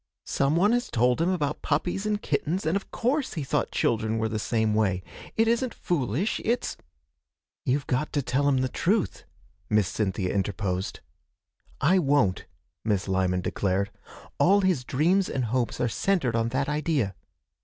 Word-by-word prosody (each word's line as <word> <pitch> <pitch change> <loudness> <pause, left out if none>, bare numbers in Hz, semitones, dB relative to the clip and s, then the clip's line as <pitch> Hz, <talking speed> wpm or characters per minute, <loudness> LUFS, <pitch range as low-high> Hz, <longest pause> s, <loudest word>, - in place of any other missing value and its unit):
Some 140 +3 +1
one 195 +6 +4
has 245 +1 0
told 125 +5 +2
him 170 - +2
about 150 -6 -1
puppies 175 +7 -1
and 210 -1 0
kittens, 180 -1 -1
and 160 +4 +1
of 200 - -3
course 265 +2 -1
he 155 - -2
thought 130 - 0
children 110 0 0
were 110 0 0
the 110 -1 -2
same 110 -1 +1
way. 95 -4 +1 0.3
It 225 0 +4
isn't 235 +2 +1
foolish, 155 - -1
it's 235 +2 0 0.4
' 65 -1 -64
'You've 135 +2 +1
got 140 +3 -1
to 145 - 0
tell 135 +3 +1
him 130 -2 +2
the 130 - +1
truth,' 190 - 0 0.4
Miss 105 -3 +3
Cynthia 95 -3 -1
interposed. 95 -1 -2 0.8
'I 175 +6 +4
won't,' 140 - +2 0.4
Miss 105 -3 0
Lyman 95 -1 +1
declared. 100 +2 -1 0.5
'All 200 +3 +5
his 185 -9 +1
dreams 175 +10 +2
and 130 -2 -1
hopes 120 +1 -1
are 120 - +2
centred 135 -3 0
on 115 0 +1
that 135 +3 -1
idea.' 150 - 0
135 Hz, 165 wpm, -27 LUFS, 110-180 Hz, 0.8 s, All